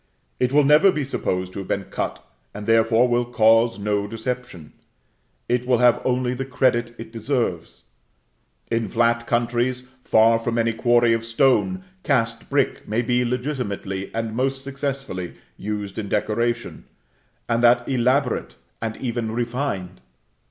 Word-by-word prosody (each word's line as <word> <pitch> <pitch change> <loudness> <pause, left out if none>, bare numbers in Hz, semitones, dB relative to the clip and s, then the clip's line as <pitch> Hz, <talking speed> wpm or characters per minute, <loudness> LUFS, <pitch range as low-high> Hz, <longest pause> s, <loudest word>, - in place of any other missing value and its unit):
It 125 0 +1
will 145 +1 +5
never 150 +7 +6
be 150 -5 -2
supposed 95 -8 -2
to - - -5
have 95 - -7
been 100 - -1
cut, - - -5 0.3
and 105 0 -6
therefore, 115 +2 +4
will 120 0 +2
cause 115 -1 +3
no 100 0 -1
deception; 115 - -6 0.7
it 125 +1 0
will 125 -1 +4
have 120 0 +4
only 125 -1 0
the 130 +1 -3
credit 120 -2 0
it 115 0 -9
deserves. 115 - -3 0.9
In 115 -1 0
flat 115 0 +1
countries, 120 +2 0
far 115 +1 +4
from 115 0 -2
any 115 0 +1
quarry 120 0 +3
of 115 0 -1
stone, 135 +11 +2 0.2
cast 115 -7 -1
brick - - 0
may 115 +3 0
be 125 +1 +1
legitimately, 120 -7 -3
and 115 -1 -3
most 135 +2 -1
successfully, 135 - -4 0.2
used 105 0 -5
in 100 -2 -5
decoration, 115 +3 -1 0.6
and 115 0 +1
that 120 0 +4
elaborate, 130 0 0 0.3
and 110 -1 -3
even 120 -3 -3
refined. 115 -6 -3
120 Hz, 145 wpm, -23 LUFS, 110-125 Hz, 0.9 s, never